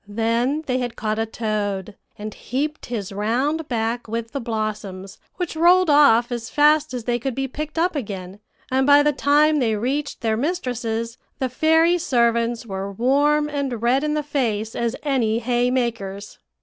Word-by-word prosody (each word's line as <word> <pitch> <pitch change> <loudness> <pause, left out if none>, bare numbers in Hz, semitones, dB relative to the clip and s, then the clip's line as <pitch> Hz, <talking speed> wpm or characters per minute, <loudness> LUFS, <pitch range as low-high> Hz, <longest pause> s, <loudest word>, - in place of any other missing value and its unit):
Then 230 +7 0
they 255 -2 0
had 245 -2 -3
caught 215 0 -2
a 225 - 0
toad, 210 -3 -3 0.2
and 210 0 -6
heaped 295 +5 -4
his 215 -6 -4
round 255 +10 -1
back 230 0 -2
with 230 +1 -4
the 280 - -3
blossoms, 215 -4 -4 0.2
which 355 -3 -4
rolled 350 +1 +5
off 250 -5 +5
as 235 -1 -4
fast 300 0 +3
as 250 -2 -4
they 240 +1 -1
could 260 0 -3
be 270 0 -2
picked 305 +4 -6
up 345 +1 +1
again; 195 -7 -5 0.3
and 265 +1 +2
by 290 0 +7
the 295 0 +2
time 295 +2 +3
they 225 -4 +1
reached 275 +7 -2
their 220 -2 0
mistresses, 245 -6 -2 0.2
the 260 - -1
fairy 320 +6 +3
servants 235 -6 +1
were 195 -1 -5
warm 285 +7 +2
and 275 -6 -3
red 255 +4 +2
in 300 0 0
the 300 - -1
face 225 -7 -1
as 235 0 -1
any 245 -7 +1
hay 245 +1 +1
makers. 225 -6 -3
245 Hz, 175 wpm, -22 LUFS, 225-290 Hz, 0.3 s, by